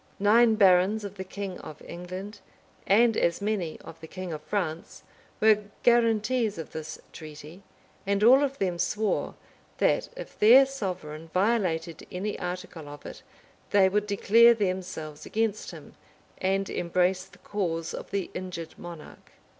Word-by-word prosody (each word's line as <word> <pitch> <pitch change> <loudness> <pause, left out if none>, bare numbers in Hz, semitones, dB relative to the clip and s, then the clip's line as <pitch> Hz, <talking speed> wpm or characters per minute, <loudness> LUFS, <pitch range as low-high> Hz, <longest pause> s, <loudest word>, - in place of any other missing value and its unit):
Nine 220 +3 +5
barons 195 +1 +4
of 200 -2 -6
the 190 - -4
king 190 0 -6
of 155 - -10
England, 185 +4 -8 0.5
and 225 +3 +5
as 170 -4 +1
many 200 -6 -2
of 165 - -12
the 160 - -9
king 185 0 -6
of 150 - -6
France, 165 -2 -4 0.4
were 215 -1 +4 0.2
guaranties 230 -1 +2
of 160 - -7
this 155 0 -7
treaty; 155 +3 -11 0.5
and 200 +1 +1
all 260 +5 +7
of 275 -1 -2
them 180 -3 -1
swore, 215 +3 -1 0.4
that, - - +1
if - - -9
their 245 +6 +8
sovereign 180 - -6
violated 180 -6 0
any 200 +3 -4
article 180 -4 -6
of 145 0 -11
it, - - -9 0.5
they 195 -2 +5
would 210 +2 0
declare 230 +4 +5
themselves 185 -7 -4
against 220 -1 -1
him, - - -11 0.5
and 195 +1 0
embrace 180 +2 0
the - - -19
cause 165 -5 -3
of - - -7
the 200 -2 -3
injured 180 -3 -7
monarch. 170 -3 -11
190 Hz, 145 wpm, -27 LUFS, 170-215 Hz, 0.5 s, their